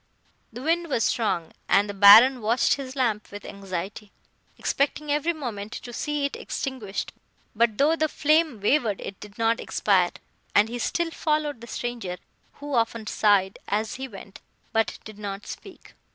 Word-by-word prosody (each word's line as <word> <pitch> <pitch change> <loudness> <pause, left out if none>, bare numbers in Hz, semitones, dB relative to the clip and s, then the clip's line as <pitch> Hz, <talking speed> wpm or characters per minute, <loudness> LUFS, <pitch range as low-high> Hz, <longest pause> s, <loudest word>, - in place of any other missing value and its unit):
] - - -40
"The 245 +3 -8
wind 335 +2 +1
was 230 -5 +1
strong, 205 -9 0 0.2
and 200 +1 +4
the 205 - -5
Baron 220 +6 +8
watched 230 +4 +2
his 265 -1 -5
lamp 225 -6 0
with 205 0 -9
anxiety, 195 +1 -6 0.5
expecting 290 +1 -1
every 300 +3 +1
moment 230 -9 -6
to 240 - -8
see 295 +2 -1
it 280 - -3
extinguished; 250 -8 -4 0.4
but, 225 -1 +2
though 300 +4 +4
the 315 -1 +1
flame 305 -5 +2
wavered, 215 -1 +1
it 195 - -7
did 205 -1 -12
not 230 0 +2
expire, 185 -4 +2 0.5
and 210 +2 +5
he 240 +1 -5
still 340 +6 -1
followed 300 -6 -1
the 235 - -10
stranger, 230 -7 -4 0.4
who 290 0 -7
often 230 -2 0
sighed 205 -2 +2
as 215 +2 -1
he 265 0 -5
went, 200 -3 -12 0.3
but 225 0 +1
did 215 -1 -10
not 200 0 -6
speak. - - -11
230 Hz, 165 wpm, -25 LUFS, 205-280 Hz, 0.5 s, Baron